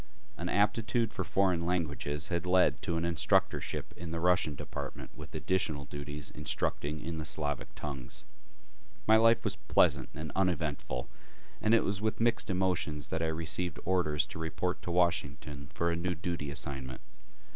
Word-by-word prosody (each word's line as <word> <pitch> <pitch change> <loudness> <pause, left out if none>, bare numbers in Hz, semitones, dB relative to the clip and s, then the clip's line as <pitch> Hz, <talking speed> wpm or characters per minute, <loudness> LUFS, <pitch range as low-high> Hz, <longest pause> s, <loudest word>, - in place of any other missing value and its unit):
An - - -3
aptitude 110 +2 +2
for 95 - -1
foreign 90 -2 +2
languages 80 -3 -1
had 85 0 -1
led 90 0 +4
to 85 - -1
an 85 - 0
instructorship 85 -2 +1
in 85 0 -6
the 85 0 -2
Russian 90 -3 +3
department - - -6
with - - -9
additional 80 -6 0
duties 70 0 -6
instructing 75 +2 -2
in 80 +1 -4
the - - -3
Slavic 75 -2 -2
tongues. 70 -3 -6 0.8
My 110 +1 +7
life 115 +1 +5
was 100 -2 -1
pleasant - - +3
and 75 0 -5
uneventful, 80 -9 0 0.5
and 110 +2 +5
it 115 - +4
was 100 0 -1
with 110 0 0
mixed 115 -1 +2
emotions 85 -6 0
that 80 - -1
I 80 - +1
received 80 +1 -2
orders 80 -5 +2
to - - -8
report 80 +3 -2
to - - -6
Washington 75 -5 0
for 85 +4 0
a - - 0
new 90 +1 -1
duty 85 -3 -3
assignment. 65 -2 -3
85 Hz, 160 wpm, -32 LUFS, 75-90 Hz, 0.8 s, My